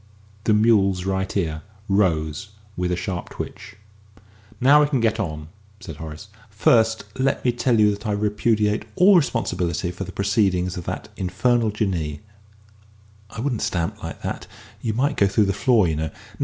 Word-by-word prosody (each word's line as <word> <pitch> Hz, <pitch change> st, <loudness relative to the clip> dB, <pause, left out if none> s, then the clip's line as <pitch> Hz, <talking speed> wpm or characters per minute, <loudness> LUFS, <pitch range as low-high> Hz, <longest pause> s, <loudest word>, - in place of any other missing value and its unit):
The 110 Hz, -, +4 dB
mule's 100 Hz, -4 st, +3 dB
right 95 Hz, +1 st, -1 dB
ear 80 Hz, -4 st, -1 dB, 0.3 s
rose 95 Hz, -2 st, 0 dB, 0.3 s
with 90 Hz, 0 st, -1 dB
a -, -, +1 dB
sharp 90 Hz, 0 st, -4 dB
twitch. -, -, -8 dB, 0.8 s
"Now 140 Hz, +4 st, +6 dB
we 150 Hz, -, +3 dB
can 135 Hz, -4 st, +1 dB
get 115 Hz, -1 st, +1 dB
on," 80 Hz, -6 st, -4 dB, 0.3 s
said 80 Hz, -8 st, -9 dB
Horace. 80 Hz, +6 st, -9 dB, 0.2 s
"First 110 Hz, +2 st, +3 dB, 0.2 s
let 135 Hz, 0 st, 0 dB
me 125 Hz, -, +4 dB
tell 120 Hz, -1 st, +1 dB
you 105 Hz, -1 st, +5 dB
that 105 Hz, +2 st, -5 dB
I 105 Hz, -, 0 dB
repudiate 105 Hz, 0 st, +1 dB
all 190 Hz, +2 st, +6 dB
responsibility 90 Hz, -, 0 dB
for 90 Hz, +2 st, -6 dB
the 95 Hz, -, -7 dB
proceedings 95 Hz, -2 st, +1 dB
of 90 Hz, -, -6 dB
that -, -, -5 dB
infernal 110 Hz, +5 st, +1 dB
Jinnee.... 90 Hz, -8 st, -2 dB, 1.1 s
I 110 Hz, -, -7 dB
wouldn't 125 Hz, -4 st, -1 dB
stamp 85 Hz, -2 st, -2 dB
like -, -, -7 dB
that -, -, -4 dB, 0.3 s
you 110 Hz, -, -1 dB
might 140 Hz, +4 st, 0 dB
go 100 Hz, -, +4 dB
through 100 Hz, +2 st, +2 dB
the 100 Hz, -, 0 dB
floor, 110 Hz, -2 st, +3 dB
you 80 Hz, -2 st, -1 dB
know.... 80 Hz, 0 st, -2 dB
100 Hz, 170 wpm, -23 LUFS, 90-115 Hz, 1.1 s, Now